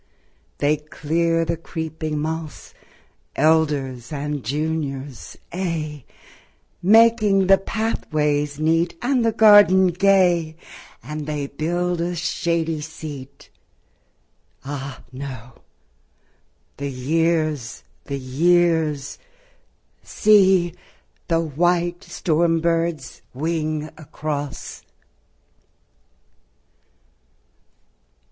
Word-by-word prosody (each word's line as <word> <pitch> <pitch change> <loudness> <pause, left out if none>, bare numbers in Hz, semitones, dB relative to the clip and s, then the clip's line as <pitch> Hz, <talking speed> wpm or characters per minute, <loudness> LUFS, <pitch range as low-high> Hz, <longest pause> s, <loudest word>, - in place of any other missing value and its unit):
They 150 +1 +2
clear 165 +3 -1
the 170 +1 -1
creeping 160 -1 -5
mossŌĆö 155 -1 -5 0.6
Elders 145 -6 +1
and 145 -1 -3
juniorsŌĆöaye, 150 - -4 0.8
Making 215 -1 +5
the 195 +1 +5
pathways 150 -9 -1
neat 165 +2 +1
And 250 -1 +2
the 225 - +2
garden 205 -4 +6
gay; 175 -3 +2 0.5
And 150 +3 -6
they 150 -2 -2
build 175 +4 -2
a 175 +1 -2
shady 165 -1 -1
seat... 145 -3 -9 1.1
Ah, 140 -1 -6
no; 130 -3 -9 1.2
the 140 0 -4
years, 155 -2 -1 0.2
the 140 - -4
years; 155 +1 +1 0.8
See, 190 -5 +4 0.5
the 165 -1 +2
white 175 +3 0
storm 165 0 +1
birds 165 -4 -1
wing 155 +1 -2
across! 145 -2 -5
160 Hz, 75 wpm, -22 LUFS, 145-175 Hz, 1.2 s, garden